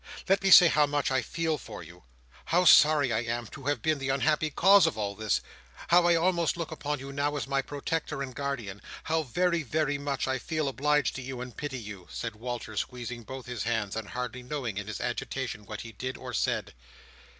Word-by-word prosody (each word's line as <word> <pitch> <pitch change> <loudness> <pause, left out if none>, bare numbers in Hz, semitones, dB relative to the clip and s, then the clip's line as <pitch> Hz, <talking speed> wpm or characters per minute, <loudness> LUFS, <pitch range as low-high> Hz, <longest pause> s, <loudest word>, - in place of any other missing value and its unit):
Let 195 +1 +3
me 195 - +2
say 180 -2 +10
how 150 -2 +3
much 145 -1 0
I 130 -1 +2
feel 160 +4 -2
for 105 -5 -9
you! 85 -1 -15 0.4
How 180 +2 +2
sorry 150 -6 +6
I 110 - +2
am, 120 0 -3
to 130 +5 -11
have 145 -4 -1
been 155 -2 +1
the 135 0 -3
unhappy 150 +3 +2
cause 195 +5 +6
of - - -2
all 100 -2 -2
this! 110 +1 0 0.5
How 175 0 +6
I 170 - +5
almost 170 -1 +1
look 165 -2 -4
upon 150 -1 -3
you 135 +1 -8
now 145 +1 0
as 140 - -3
my 135 0 +1
protector 145 +1 -3
and 130 -2 -7
guardian! 120 -8 -4 0.2
How 160 0 +1
very, 170 +5 0
very 145 0 -1
much, 140 -2 -2
I 130 0 0
feel 155 +2 -2
obliged 145 -1 +1
to - - -5
you 130 0 -6
and 125 -1 -7
pity 145 -3 -4
you!" 105 -6 -9
said 115 -2 -5
Walter, 120 -1 -5
squeezing 125 +1 -4
both 130 +3 -8
his 125 -3 -5
hands, 110 -3 -1
and 110 -2 -5
hardly 125 0 -4
knowing, 125 -6 -4
in 105 - -7
his 110 - -5
agitation, 115 -6 -4
what 105 0 -6
he 115 - -8
did 130 +4 -5
or - - -8
said. - - -1
135 Hz, 215 wpm, -29 LUFS, 115-150 Hz, 0.5 s, say